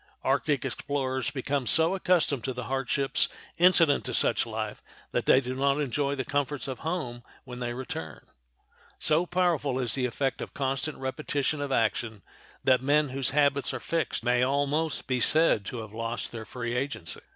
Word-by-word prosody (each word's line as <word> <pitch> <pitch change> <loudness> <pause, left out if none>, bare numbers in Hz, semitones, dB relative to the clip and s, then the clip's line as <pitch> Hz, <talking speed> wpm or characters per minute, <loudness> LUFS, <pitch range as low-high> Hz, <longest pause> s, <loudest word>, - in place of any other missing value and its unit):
Arctic 140 +1 +1
explorers 130 -1 -2
become 135 -1 -2
so 160 - +4
accustomed 175 -8 +2
to 130 - -2
the 125 0 -5
hardships 135 +1 0 0.3
incident 170 -4 +5
to - - -2
such - - +2
a - - -9
life - - -4 0.3
that - - -1
they 130 - +7
do 130 -1 -4
not 140 +2 +1
enjoy 140 0 0
the 130 -2 -3
comforts 145 -2 -1
of 130 -2 -5
home 155 -8 -3 0.2
when 125 -1 -8
they 120 -1 -3
return. 80 - -6 0.7
So 160 +3 +2
powerful 170 -7 +1
is 125 -4 +2
the 130 -2 +1
effect 135 +2 -2
of - - -7
constant 135 +2 -1
repetition 135 +2 -2
of 140 -1 -3
action 110 -3 0 0.4
that 130 -1 +4
men 145 +2 +3
whose 135 0 0
habits 140 -1 +2
are - - -3
fixed 165 -8 -2
may 125 0 +2
almost 145 +4 0
be 130 -1 0
said 155 -10 +4
to 120 +2 -5
have 110 -1 -10
lost 115 +1 -3
their 115 -2 -7
free 120 0 -4
agency. 130 -10 -3
135 Hz, 175 wpm, -28 LUFS, 125-145 Hz, 0.7 s, they